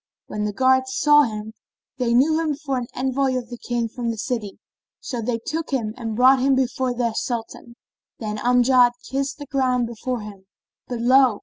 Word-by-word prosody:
When 210 Hz, 0 st, -4 dB
the 210 Hz, -, -1 dB
guards 260 Hz, +3 st, +2 dB
saw 295 Hz, 0 st, +6 dB
him, 215 Hz, -1 st, -6 dB, 0.5 s
they 235 Hz, -2 st, +1 dB
knew 310 Hz, +6 st, +4 dB
him 310 Hz, -3 st, 0 dB
for 280 Hz, -2 st, -3 dB
an 240 Hz, -, -5 dB
envoy 265 Hz, +1 st, 0 dB
from 255 Hz, -1 st, -2 dB
the 240 Hz, -, -6 dB
King 240 Hz, -1 st, -2 dB
of 235 Hz, -1 st, -1 dB
the 230 Hz, -, -3 dB
city; 225 Hz, -3 st, -4 dB, 0.4 s
so 245 Hz, -4 st, -5 dB
they 230 Hz, +1 st, -1 dB
took 310 Hz, +8 st, -4 dB
him 230 Hz, -6 st, -1 dB
and 225 Hz, -3 st, -5 dB
brought 260 Hz, +3 st, +6 dB
him 270 Hz, +1 st, +3 dB
before 255 Hz, -1 st, 0 dB
their 235 Hz, -2 st, 0 dB
Sultan. 235 Hz, 0 st, -5 dB, 0.4 s
Then 215 Hz, -2 st, -4 dB
Amjad 245 Hz, 0 st, +4 dB
kissed 275 Hz, +2 st, -2 dB
the 290 Hz, -, -8 dB
ground 255 Hz, -3 st, +1 dB
before 235 Hz, +1 st, -4 dB
him; 200 Hz, -2 st, -11 dB, 0.4 s
but 245 Hz, -2 st, -4 dB
lo! 255 Hz, -2 st, +5 dB
250 Hz, 190 wpm, -22 LUFS, 230-265 Hz, 0.5 s, saw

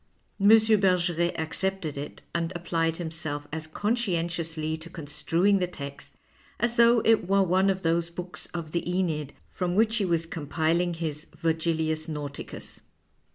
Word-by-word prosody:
M. 200 Hz, -, +3 dB
Bergeret 185 Hz, -6 st, +4 dB
accepted 165 Hz, 0 st, -2 dB
it 140 Hz, +1 st, -7 dB
and 170 Hz, 0 st, -1 dB
applied 165 Hz, -1 st, 0 dB
him 165 Hz, -2 st, -4 dB
self 145 Hz, -3 st, -4 dB
as 160 Hz, 0 st, -4 dB
conscientiously 170 Hz, -6 st, -1 dB
to 160 Hz, +1 st, -9 dB
construing 170 Hz, +6 st, +1 dB
the 180 Hz, -, +1 dB
text 140 Hz, -5 st, -8 dB, 0.4 s
as 235 Hz, 0 st, +1 dB
though 235 Hz, -1 st, +5 dB
it 225 Hz, -5 st, +4 dB
were 195 Hz, 0 st, +4 dB
one 190 Hz, +2 st, +3 dB
of 190 Hz, 0 st, -1 dB
those 165 Hz, +1 st, +1 dB
books 180 Hz, +1 st, -6 dB
of 165 Hz, -3 st, -6 dB
the 170 Hz, -, 0 dB
.Eneid 165 Hz, -6 st, 0 dB, 0.2 s
from 180 Hz, -1 st, -2 dB
which 225 Hz, +2 st, +3 dB
he 205 Hz, -, +1 dB
was 165 Hz, -2 st, +1 dB
compiling 165 Hz, +2 st, 0 dB
his 155 Hz, -2 st, -4 dB
" -, -, -20 dB
Virgilius 160 Hz, -1 st, 0 dB
Nauticus." 145 Hz, -2 st, -6 dB
170 Hz, 155 wpm, -27 LUFS, 160-190 Hz, 0.4 s, though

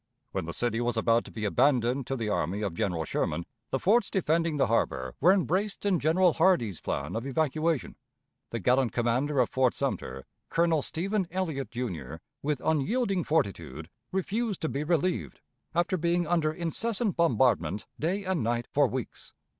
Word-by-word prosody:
When -, -, -2 dB
the 85 Hz, -, -4 dB
city 120 Hz, +2 st, 0 dB
was 120 Hz, -1 st, 0 dB
about 115 Hz, +1 st, +3 dB
to -, -, -10 dB
be 110 Hz, -1 st, -4 dB
abandoned 125 Hz, +3 st, +2 dB
to 135 Hz, -, -1 dB
the 115 Hz, -4 st, -3 dB
army 100 Hz, +1 st, -1 dB
of 100 Hz, -5 st, -2 dB
General 85 Hz, -2 st, -1 dB
Sherman, 85 Hz, +3 st, -1 dB, 0.2 s
the -, -, 0 dB
forts 210 Hz, -, +3 dB
defending 165 Hz, -3 st, +1 dB
the 140 Hz, -, +4 dB
harbor 65 Hz, -, 0 dB
were 175 Hz, +6 st, +6 dB
embraced 195 Hz, +2 st, 0 dB
in 190 Hz, -4 st, +3 dB
General 165 Hz, +3 st, +3 dB
Hardee's 160 Hz, -, +2 dB
plan 70 Hz, +6 st, -3 dB
of 115 Hz, +4 st, -3 dB
evacuation. 155 Hz, +1 st, 0 dB, 0.5 s
The 115 Hz, -, -3 dB
gallant 125 Hz, +3 st, +2 dB
commander 125 Hz, +4 st, +1 dB
of 125 Hz, -, +2 dB
Fort 130 Hz, -2 st, +2 dB
Sumter, 65 Hz, 0 st, -3 dB, 0.2 s
Colonel 165 Hz, -2 st, +2 dB
Stephen 190 Hz, +6 st, -1 dB
Elliott, 160 Hz, -7 st, -2 dB
Jr., 85 Hz, -, -4 dB, 0.3 s
with 145 Hz, -2 st, -2 dB
unyielding 190 Hz, -, +1 dB
fortitude, 85 Hz, -, -1 dB, 0.2 s
refused 205 Hz, +3 st, -1 dB
to 160 Hz, -, +1 dB
be 140 Hz, +2 st, -2 dB
relieved, 175 Hz, +3 st, 0 dB, 0.4 s
after 175 Hz, +2 st, +2 dB
being 170 Hz, +1 st, +1 dB
under 160 Hz, -2 st, +1 dB
incessant 200 Hz, +6 st, -1 dB
bombardment 125 Hz, -, +2 dB
day 185 Hz, +6 st, -1 dB
and 185 Hz, -3 st, 0 dB
night 120 Hz, +1 st, 0 dB
for 145 Hz, -1 st, +4 dB
weeks. 125 Hz, -1 st, -6 dB
145 Hz, 165 wpm, -28 LUFS, 115-175 Hz, 0.5 s, were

